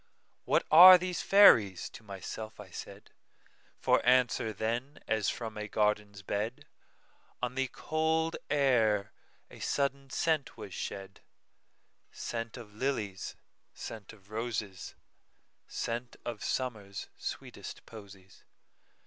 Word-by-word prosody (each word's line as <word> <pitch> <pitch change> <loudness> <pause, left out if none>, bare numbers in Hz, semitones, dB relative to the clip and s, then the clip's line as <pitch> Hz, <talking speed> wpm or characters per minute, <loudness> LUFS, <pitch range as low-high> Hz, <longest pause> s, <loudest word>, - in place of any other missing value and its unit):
"What - - +2
are 180 +4 +12
these 180 0 -3
fairies?" 110 - +6
to - - -11
myself 105 +2 -7
I - - -11
said; - - -10 0.7
For - - +2
answer, 125 -3 +3
then, 120 +7 -3
as 110 -2 +1
from 110 -2 -5
a 105 - -4
garden's 105 -1 0
bed, 105 +5 -3 0.7
On 125 0 -2
the 135 0 0
cold 160 +4 -1
air 115 -8 +2 0.4
a - - -12
sudden 140 -1 -1
scent 155 -1 0
was 105 -4 -8
shed,—Scent 110 +4 -8
of 110 -4 -11
lilies, 105 -5 -3 0.4
scent 110 -3 -8
of 105 -2 -19
roses, 110 -4 -4 0.7
Scent 120 +1 -4
of 120 -3 -5
Summer's 105 -6 -3
sweetest - - -7
posies. 100 -3 -14
115 Hz, 110 wpm, -31 LUFS, 105-135 Hz, 0.7 s, are